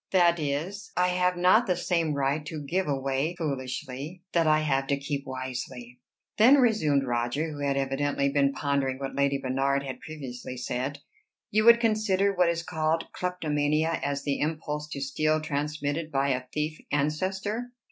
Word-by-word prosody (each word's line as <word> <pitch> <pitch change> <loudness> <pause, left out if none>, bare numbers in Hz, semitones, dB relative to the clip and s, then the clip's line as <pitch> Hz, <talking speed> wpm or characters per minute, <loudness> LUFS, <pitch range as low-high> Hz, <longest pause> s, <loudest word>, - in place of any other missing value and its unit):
That 175 -2 +4
is, 160 +9 -3
I 180 0 +3
have 180 0 +1
not 185 +7 +5
the 180 - +2
same 170 -4 0
right 140 +2 0
to 155 -2 -5
give 185 +5 0
away 135 +3 -1
foolishly 140 +2 -4
that 165 -2 +3
I 155 0 +4
have 135 -3 0
to 140 - +1
keep 140 0 -4
wisely." 130 -1 -6 0.4
"Then," 245 +6 +8
resumed 210 - +3
Roger, 120 +6 -1
who 145 - -7
had 140 -1 0
evidently 140 +1 0
been 140 0 +2
pondering 140 -2 -1
what 135 0 -5
Lady 140 0 +2
Bernard 135 +1 0
had 130 -2 -6
previously 130 -5 -7
said, 125 +3 -3 0.5
"you 215 +1 +3
would 235 0 +8
consider 215 -4 +2
what 180 -2 +3
is 170 0 -1
called 160 -1 -1
kleptomania 155 -2 0
as 140 0 -2
the 140 -1 -1
impulse 150 -1 -2
to 140 - -5
steal 155 +3 +1
transmitted 150 +1 -2
by 140 0 +1
a 125 -1 -1
thief 155 +1 -2
ancestor?" 190 +11 -1
150 Hz, 165 wpm, -27 LUFS, 140-170 Hz, 0.5 s, Then